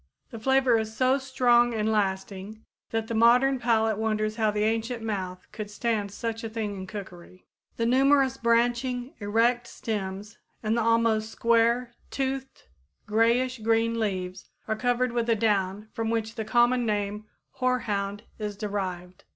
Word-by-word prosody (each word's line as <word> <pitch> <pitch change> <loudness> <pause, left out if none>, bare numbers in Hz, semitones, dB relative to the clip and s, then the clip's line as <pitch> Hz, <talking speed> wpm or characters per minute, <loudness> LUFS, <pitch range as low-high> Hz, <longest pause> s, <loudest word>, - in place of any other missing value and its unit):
The 230 - -7
flavor 265 -1 +3
is 220 0 -5
so 260 +1 +3
strong 240 -3 +3
and 220 0 0
lasting 200 +1 -2 0.2
that 225 -1 -1
the 230 - -4
modern 250 +4 +4
palate 225 -3 +1
wonders 215 0 -1
how 220 -2 +2
the 210 0 0
ancient 225 +2 -1
mouth 185 -4 -4
could 215 -1 -6
stand 210 -1 -1
such 225 +2 -4
a 225 - -3
thing 215 -2 -3
in 190 -1 -7
cookery. 185 -3 -10 0.3
The 230 - 0
numerous 270 +2 +4
branching, 245 +1 +1
erect 235 +3 +1
stems 205 -2 -5 0.2
and 220 +1 +1
the 235 - +1
almost 225 -1 +2
square, 235 +2 +2 0.2
toothed, 270 0 -4 0.4
grayish 235 +4 +2
green 225 +1 +1
leaves 185 -3 -3 0.2
are 220 - 0
covered 245 +2 +1
with 235 -1 -1
a 230 - +4
down 205 -1 0
from 225 -1 -2
which 225 -1 -1
the 220 -2 -4
common 240 +2 +3
name 210 -1 -2 0.3
hoarhound 210 -5 -1 0.2
is 210 -2 -4
derived. 185 -4 -4
225 Hz, 150 wpm, -27 LUFS, 210-240 Hz, 0.4 s, modern